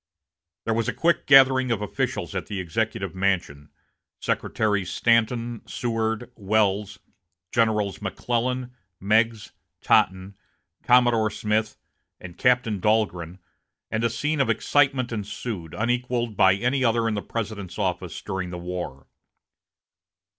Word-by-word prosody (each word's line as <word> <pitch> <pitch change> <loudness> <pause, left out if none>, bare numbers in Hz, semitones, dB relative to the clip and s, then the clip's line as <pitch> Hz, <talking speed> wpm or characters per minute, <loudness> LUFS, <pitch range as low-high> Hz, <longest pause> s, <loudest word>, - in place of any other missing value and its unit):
There 115 - +1
was 115 0 0
a - - -3
quick 170 +1 +1
gathering 130 -2 +6
of 115 -3 0
officials 105 - -3
at - - -4
the 100 -2 -4
Executive 95 +1 -2
Mansion 95 -7 -1 0.5
Secretaries 105 -4 -1
Stanton, 115 0 +1
Seward, 115 0 -2
Welles, 105 -1 0 0.5
Generals 105 -4 +1
McClellan, 125 +5 -2 0.3
Meigs, 110 +2 +1 0.3
Totten, 95 +2 +2 0.5
Commodore 120 -3 +4
Smith, 110 +1 -1 0.4
and 90 -2 -10
Captain 125 -5 +2
Dahlgren 95 -5 0 0.5
and 110 +1 -1
a 115 - +3
scene 150 +6 -1
of 135 - +1
excitement 135 -4 +2
ensued, 105 -5 -5
unequaled 120 0 -1
by 95 0 +5
any 125 +6 0
other 115 -1 +2
in 110 - 0
the 105 - -2
President's 100 -6 -5
office 90 -3 -3
during 95 -3 -4
the 90 - -6
war. 85 -6 -6
110 Hz, 120 wpm, -24 LUFS, 95-120 Hz, 0.5 s, gathering